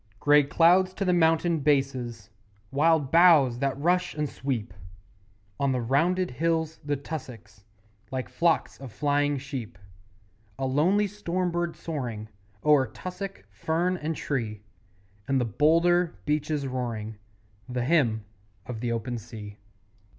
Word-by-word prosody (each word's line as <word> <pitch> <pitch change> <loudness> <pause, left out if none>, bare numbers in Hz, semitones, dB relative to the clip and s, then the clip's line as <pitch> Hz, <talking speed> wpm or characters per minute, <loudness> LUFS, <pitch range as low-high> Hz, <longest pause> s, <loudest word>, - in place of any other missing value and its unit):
Grey 145 0 +6
cloud 170 +6 +4
to 185 +1 -4
the 180 - +3
mountain 165 0 +3
bases, 130 -6 -1 0.4
Wild 150 -1 +2
boughs 160 -8 +6
that 135 -1 -1
rush 180 +4 +1
and 150 -1 -1
sweep; 125 -9 -4 0.9
On 140 -1 +1
the 125 - 0
rounded 165 +9 +1
hills 160 +3 -1
the 145 0 -1
tussocks 120 -9 -9 0.4
Like 130 -2 -3
flocks 170 -1 0
of 135 -3 -9
flying 145 +2 +1
sheep; 130 -8 -6 0.8
A 135 - -2
lonely 170 +11 +2
storm 185 -3 -2
bird 175 0 -2
soaring 120 -9 -5 0.3
O'er 150 -4 +4
tussock, 185 - -7
fern 165 - 0
and 160 -2 -3
tree; 110 -9 -3 0.6
And 135 -1 +2
the 125 - +1
boulder 165 - +3
beaches 150 -1 -1
roaring 115 -5 -4 0.5
The 125 -1 -2
Hymn 120 -9 +2 0.4
of 125 -3 -6
the 120 0 -2
Open 115 +1 -3
Sea. 105 -2 -10
145 Hz, 130 wpm, -27 LUFS, 125-165 Hz, 0.9 s, Grey